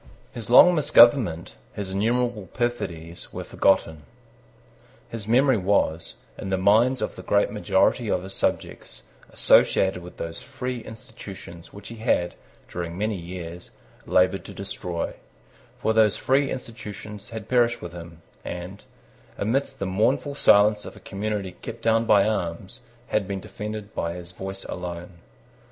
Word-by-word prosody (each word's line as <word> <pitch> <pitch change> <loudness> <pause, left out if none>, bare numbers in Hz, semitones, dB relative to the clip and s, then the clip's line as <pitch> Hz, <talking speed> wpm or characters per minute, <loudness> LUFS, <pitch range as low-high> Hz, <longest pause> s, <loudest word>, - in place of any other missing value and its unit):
His 115 -3 -6
long 180 +8 +8
misgovernment, 120 - +5 0.2
his 100 -2 -4
innumerable 115 +1 0
perfidies, 90 -9 -3
were - - -5
forgotten. 80 -5 +1 1.1
His 110 -3 -6
memory 130 +2 +4
was, 90 -4 0 0.2
in - - -5
the 95 - +1
minds 110 +7 +3
of - - -3
the - - -8
great 100 0 +2
majority 105 +2 +1
of 90 - 0
his 95 +1 -6
subjects, - - -3 0.3
associated 95 -2 +3
with 90 0 -12
those 85 0 -5
free 130 -2 -5
institutions 100 -6 -11
which 100 0 -10
he 115 - -9
had, 90 -6 +1 0.3
during 85 -1 -5
many 105 +2 -1
years, 85 -1 -8 0.4
laboured 90 +1 +3
to - - -10
destroy: 95 -4 -4 0.7
for 110 - +1
those 110 -2 +4
free 135 +1 +2
institutions 105 -4 -8
had 110 -2 -7
perished 120 -1 +2
with 85 0 -7
him, 85 -1 -11 0.2
and, 90 +3 -7 0.5
amidst 130 +7 -1
the 100 - -3
mournful 110 +9 +1
silence 105 -5 +5
of - - -9
a - - -13
community 100 -1 -4
kept 115 - -8
down 115 0 +3
by 100 -3 +5
arms, 85 -6 -3 0.3
had 105 -3 0
been 100 0 -3
defended 105 +2 -7
by 85 0 -2
his 90 -1 -9
voice 95 +1 -6
alone. 90 0 -7
100 Hz, 145 wpm, -25 LUFS, 90-115 Hz, 1.1 s, long